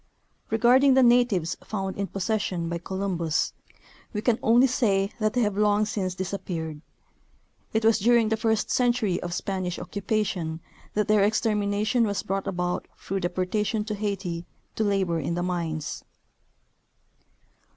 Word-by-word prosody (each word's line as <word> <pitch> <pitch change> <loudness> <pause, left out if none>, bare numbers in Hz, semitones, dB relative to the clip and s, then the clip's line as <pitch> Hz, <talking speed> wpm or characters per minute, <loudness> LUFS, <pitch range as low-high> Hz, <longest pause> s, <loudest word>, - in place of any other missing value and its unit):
Regarding 250 +4 +5
the 265 - +6
natives 235 -9 +3
found 195 -3 -3
in 200 0 -2
possession 190 -3 -2
by 170 0 -2
Columbus, 175 -4 -1 0.6
we 210 - -2
can 240 -2 +2
only 235 +3 +5
say 205 -6 +1
that 215 -1 +1
they 250 - +1
have 210 -3 +1
long 210 0 +3
since 190 -4 -2
disappeared. 170 -5 -4 0.9
It 220 0 0
was 225 0 +5
during 230 +1 +4
the 220 - +2
first 220 -1 0
century 240 -7 +1
of 175 - -4
Spanish 185 -1 -2
occupation 190 -6 -2 0.4
that 210 +1 +1
their 210 -2 +4
exter 215 +2 +2
mination 210 +3 +1
was 200 -1 -2
brought 195 0 -2
about 180 -1 -2
through 195 +1 -3
deportation 190 +4 -1
to 215 - -3
Haiti 195 -5 -3 0.3
to 220 - -1
labor 190 -5 +1
in 165 +3 -2
the 175 - -1
mines. 165 -4 -3
200 Hz, 145 wpm, -26 LUFS, 180-220 Hz, 0.9 s, the